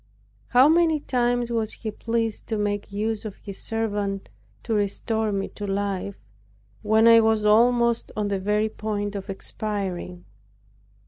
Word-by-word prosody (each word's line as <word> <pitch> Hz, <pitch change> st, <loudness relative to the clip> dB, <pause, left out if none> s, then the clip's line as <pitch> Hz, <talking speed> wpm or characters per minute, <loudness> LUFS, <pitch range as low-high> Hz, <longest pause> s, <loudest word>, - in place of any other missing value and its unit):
How 255 Hz, +3 st, +6 dB
many 320 Hz, -1 st, +4 dB
times 245 Hz, -3 st, 0 dB
was 225 Hz, -2 st, -1 dB
He 220 Hz, -, -5 dB
pleased 225 Hz, 0 st, -2 dB
to 220 Hz, -, -1 dB
make 205 Hz, -1 st, -2 dB
use 215 Hz, +1 st, -2 dB
of 210 Hz, -3 st, -6 dB
His 200 Hz, -2 st, -10 dB
servant 205 Hz, -, -2 dB, 0.3 s
to 225 Hz, -, -2 dB
restore 215 Hz, +1 st, 0 dB
me 195 Hz, -1 st, -1 dB
to 205 Hz, -, -7 dB
life, 200 Hz, 0 st, -2 dB, 0.7 s
when 220 Hz, +1 st, +4 dB
I 230 Hz, 0 st, +8 dB
was 220 Hz, -1 st, +2 dB
almost 235 Hz, +2 st, +3 dB
on 210 Hz, -1 st, 0 dB
the 200 Hz, -1 st, -1 dB
very 210 Hz, +3 st, +1 dB
point 210 Hz, -1 st, -3 dB
of 200 Hz, +1 st, -6 dB
expiring! 190 Hz, -3 st, -4 dB
215 Hz, 145 wpm, -24 LUFS, 200-230 Hz, 0.7 s, I